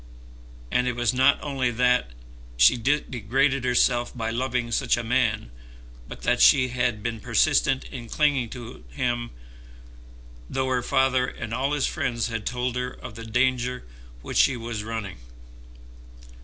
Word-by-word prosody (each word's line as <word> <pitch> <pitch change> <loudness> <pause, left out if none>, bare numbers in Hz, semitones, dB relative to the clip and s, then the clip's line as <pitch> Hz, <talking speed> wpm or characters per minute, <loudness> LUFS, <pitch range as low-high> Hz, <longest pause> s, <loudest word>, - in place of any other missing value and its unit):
And 125 0 +1
it 125 - -1
was 120 0 +1
not 130 +3 +4
only 135 -4 -1
that 125 - +2 0.5
she - - +7
had 145 +4 +1
degraded 130 +3 +1
herself 120 0 +1
by 115 -1 -2
loving 125 0 -2
such 115 - +1
a 120 - -3
man, 115 - 0 0.6
but - - -10
that - - +1
she 95 - +6
had 120 -3 -1
been 115 -1 -3
persistent 130 +4 +2
in 120 -3 -9
clinging 145 -6 +1
to 120 - -9
him 120 - -2 1.2
though 130 0 -1
her 125 -1 +1
father 130 0 +2
and 115 - -6
all 135 +4 0
his 145 -2 +1
friends 125 -7 -2
had 115 -2 -4
told 125 0 -2
her 125 0 -2
of 125 - -10
the 115 +1 -9
danger 125 +1 0 0.4
which - - -4
she 135 - +4
was 115 -2 -5
running. 110 - -5
125 Hz, 155 wpm, -25 LUFS, 115-130 Hz, 1.2 s, she